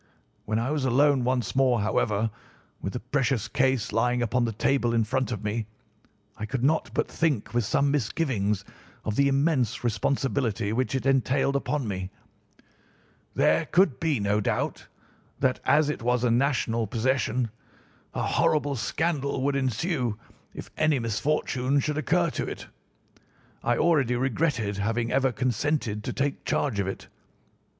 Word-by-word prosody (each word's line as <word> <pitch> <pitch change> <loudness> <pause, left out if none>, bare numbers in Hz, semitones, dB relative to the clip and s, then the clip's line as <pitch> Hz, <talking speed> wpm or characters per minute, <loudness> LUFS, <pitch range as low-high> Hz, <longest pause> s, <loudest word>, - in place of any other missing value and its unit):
When 110 - -1
I 120 +5 -1
was 150 -3 -1
alone 135 +1 +3
once 125 0 -1
more, 130 -3 +3
however, 110 +1 0 0.5
with 95 - -4
the 125 - -3
precious 125 -3 0
case 130 -2 +1
lying 120 +1 +2
upon 120 +2 +1
the 115 - -1
table 120 +1 +1
in 115 - +3
front 130 +3 -1
of 110 -3 -4
me, 105 +1 -2 0.7
I 110 - -5
could 130 0 -3
not 155 +4 +2
but - - +1
think 150 -11 -1
with 120 -2 +1
some 140 +6 +2
misgivings 105 - 0 0.4
of 110 - -1
the 140 +3 +4
immense 135 -5 +1
responsibility 120 -2 0
which 130 +3 0
it 130 - -2
entailed 135 +1 +2
upon 140 -2 -1
me. 95 -2 -3 1.3
There - - +3
could 180 -7 +3
be 155 -7 +1
no 105 +1 +1
doubt - - -2 0.5
that, 130 -1 +1
as 150 -1 +4
it 150 -5 -3
was 125 +1 +1
a 120 - +3
national 115 -3 +1
possession, 120 0 0 0.6
a - - -1
horrible 145 -2 +1
scandal 140 0 -1
would 140 0 +1
ensue 130 - -1 0.4
if - - -8
any 155 -2 +3
misfortune 130 +3 0
should 150 +2 -1
occur 170 +1 +1
to - - -3
it. - - -6 1.0
I 120 0 +1
already 145 -7 +3
regretted 120 -5 0
having 115 +3 -1
ever 135 0 +2
consented 125 -2 -1
to - - -2
take 140 0 -2
charge 130 -9 0
of 100 - 0
it. 95 - -6
125 Hz, 155 wpm, -26 LUFS, 115-140 Hz, 1.3 s, the